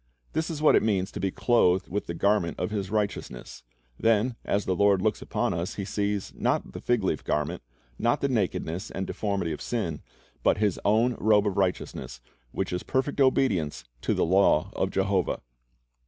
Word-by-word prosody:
This 160 +1 -1
is 155 -2 -4
what 155 - +6
it - - +5
means 95 -4 0
to - - -6
be 95 - 0
clothed 95 -4 +2
with 105 +3 -3
the 85 - -4
garment 100 -2 +1
of - - -2
His 100 -3 -2
righteousness. 100 -13 -3 0.4
Then 115 +2 +2
as 100 0 0
the 95 - 0
Lord 100 0 +4
looks - - 0
upon - - -1
us, 85 +2 -3
He 100 - -4
sees, 100 -1 -2
not - - 0
the - - -8
fig 120 -4 +1
leaf 80 -5 -1
garment, 75 +4 -1 0.4
not 120 +5 +2
the 140 - +1
nakedness 95 -7 -1
and 95 - -4
deformity 100 -6 -2
of 75 - -5
sin, 85 -11 -2 0.4
but - - +3
His 105 -3 +1
own 115 +4 +3
robe 105 -1 +4
of 100 -2 0
righteousness, 95 -8 -2 0.3
which 95 +5 -3
is 90 - -1
perfect 135 +2 -1
obedience 95 - +2 0.2
to - - 0
the - - +2
law 90 -3 +3
of - - 0
Jehovah. 95 -1 0
100 Hz, 185 wpm, -27 LUFS, 90-110 Hz, 0.4 s, what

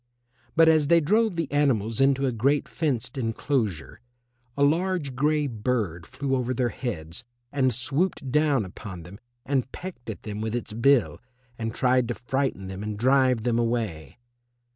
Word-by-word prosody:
But 165 0 +6
as 155 -2 +4
they 170 +2 +6
drove 210 +5 +2
the 165 -1 0
animals 130 -5 +1
into 135 0 +3
a 130 - +1
great 135 +6 +1
fenced 135 -4 -2
enclosure, 110 - -2 0.6
a 140 - +3
large 165 -1 +1
grey 150 +3 +1
bird 105 - -2
flew 135 -2 -2
over 125 0 -1
their 125 -1 +1
heads 90 - -4 0.3
and 130 -2 +2
swooped 135 - -1
down 145 -6 +2
upon 95 -1 -9
them 95 +5 -12 0.3
and 130 -2 0
pecked 175 -11 -8
at 110 - -6
them 105 0 -5
with 110 +1 -2
its 120 -2 -4
bill, 115 - +3 0.4
and 115 0 -3
tried 125 -1 +2
to 120 - -2
frighten 130 -5 -2
them 95 +1 -6
and 105 0 -4
drive 130 -1 +3
them 120 -1 +1
away. 110 - -2
125 Hz, 165 wpm, -26 LUFS, 110-140 Hz, 0.6 s, But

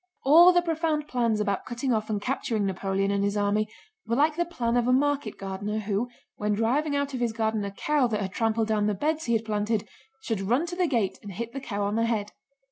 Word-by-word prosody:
All 335 +6 +8
the 350 -1 +3
profound 320 -2 -1
plans 235 -5 +1
about 200 -2 -1
cutting 245 +1 -1
off 215 -1 -1
and 210 -2 0
capturing 225 -2 -1
Napoleon 195 +1 -1
and 200 0 +1
his 200 +1 0
army 205 +1 +1 0.4
were 230 - +1
like 300 +3 +3
the 345 +1 0
plan 245 -9 -1
of 240 0 +2
a - - +4
market 275 -3 +1
gardener 195 +2 -4
who, 215 +3 -1 0.3
when 210 0 0
driving 280 +7 +1
out 280 0 -1
of 255 - -3
his 235 -2 0
garden 220 -1 0
a 200 - -3
cow 275 +6 +1
that 215 -3 -1
had 195 -2 -3
trampled 225 -1 +1
down 210 -1 +1
the 210 - 0
beds 310 +9 -1
he 235 - +1
had 225 0 +1
planted, 215 0 -1 0.4
should 220 -4 -2
run 245 - +1
to 350 0 -5
the 360 -1 +1
gate 230 -10 0
and 200 -1 -8
hit 235 +5 -5
the 275 - -5
cow 205 -5 -3
on 205 +2 -1
the 230 - +2
head. 215 -3 -1
225 Hz, 240 wpm, -27 LUFS, 205-275 Hz, 0.4 s, All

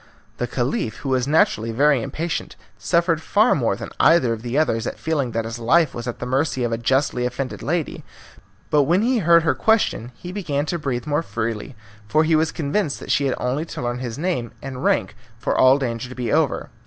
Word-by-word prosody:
The - - -2
Caliph, 110 - -2
who 135 - -4
was 130 -1 +1
naturally 115 -7 +2
very 140 +2 +3
impatient, 165 +8 -4 0.2
suffered 170 -2 +1
far 215 +8 +3
more 115 -8 +1
than - - -8
either 145 -8 +5
of 110 - -6
the 120 +3 -3
others 115 -7 +1
at - - -4
feeling 150 -6 -1
that 115 -1 -2
his 115 +1 -5
life 140 +6 +3
was 120 +1 -6
at 120 - -4
the - - -5
mercy 130 0 0
of 120 - -1
a 115 - 0
justly 130 +1 +1
offended 125 +1 -3
lady, 165 +1 -2 0.7
but 145 -2 +4
when 180 +7 +2
he 245 0 +2
heard 170 -2 +5
her 165 - +2
question 215 - +1
he 175 - -8
began 150 -8 -2
to 170 +2 -2
breathe 135 -4 -3
more 150 +1 0
freely, 115 -3 -4 0.3
for 155 +7 +3
he 160 0 +3
was 155 0 +2
convinced 155 +1 -1
that - - -5
she 140 - +2
had 130 - 0
only 130 +5 -1
to - - -7
learn 120 0 -2
his 120 -3 -5
name 150 -8 -2
and 130 -2 -7
rank - - +1 0.2
for 115 - -1
all 130 +1 +6
danger 125 -3 -3
to 130 - -9
be 125 -2 -2
over. 155 -2 0
140 Hz, 215 wpm, -22 LUFS, 120-160 Hz, 0.7 s, all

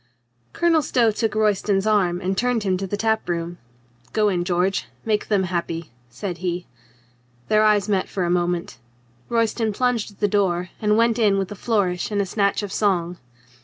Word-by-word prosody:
Colonel 335 -2 +3
Stow 235 -5 +2
took 220 +1 -1
Royston's 205 -2 +1
arm 190 -5 +2
and 190 +1 -1
turned 240 +1 0
him 190 -2 +1
to 195 +1 -4
the 205 - -3
tap 220 -1 0
room. 170 0 -3 0.5
"Go 215 -1 +3
in, 180 -3 0
George. 180 +2 0 0.2
Make 215 -2 0
them 200 -3 +2
happy," 170 -2 -3 0.2
said 175 - -5
he. 180 0 -3 0.8
Their 215 0 +4
eyes 210 -2 +3
met 195 -3 0
for 190 - -2
a 175 - 0
moment. 175 -6 -1 0.5
Royston 230 -1 +1
plunged 245 0 0
at - - -26
the 205 - +2
door 185 -3 0
and 210 0 +3
went 230 +1 +3
in 205 -3 +3
with 195 0 -2
a - - -5
flourish 195 -5 0
and 205 -1 -1
a 200 - +1
snatch 200 +1 0
of 200 - -5
song. 180 -4 0
200 Hz, 185 wpm, -22 LUFS, 180-215 Hz, 0.8 s, Their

